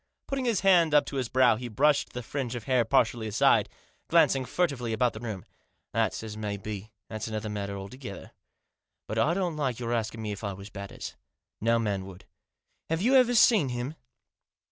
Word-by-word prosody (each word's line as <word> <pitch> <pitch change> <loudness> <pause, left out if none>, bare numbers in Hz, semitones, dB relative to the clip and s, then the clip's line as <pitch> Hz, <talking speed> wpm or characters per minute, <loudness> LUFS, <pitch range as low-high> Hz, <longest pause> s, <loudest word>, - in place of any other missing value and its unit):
Putting 275 -2 -2
his 230 -5 +1
hand 175 -5 +5
up 150 - +5
to 140 - -5
his 125 -3 -2
brow 125 -3 +4
he 125 +1 -5
brushed 140 +6 +2
the 125 - -5
fringe 125 -1 -3
of 120 - -5
hair 125 0 +2
partially 115 0 +1
aside, 105 - +3 0.4
glancing 135 -1 +4
furtively 130 -9 -1
about 120 +2 +1
the 110 - -7
room. 110 -6 -6 0.2
" - - -49
That's - - 0
as 110 -1 -6
may 105 -1 -3
be; 105 +1 -6 0.2
that's 110 0 -5
another 110 -1 -4
matter 100 -1 -4
alto 100 +6 -8
gether. 120 -8 -9 0.7
But 110 - -3
I 160 +9 +3
don't 180 -5 -1
like 130 -6 -1
your 120 -1 -2
asking 110 -1 -2
me 105 - -3
if 100 0 -7
I 100 -1 -2
was 100 +2 -10
Batters. 100 -1 -7 0.5
No 115 +2 +3
man 100 -4 -1
would. 95 -1 -12 0.6
Have 165 +3 0
you 250 +4 +3
ever 250 -2 +5
seen 215 - +5
him?" 125 +4 -3
120 Hz, 200 wpm, -28 LUFS, 105-145 Hz, 0.7 s, hand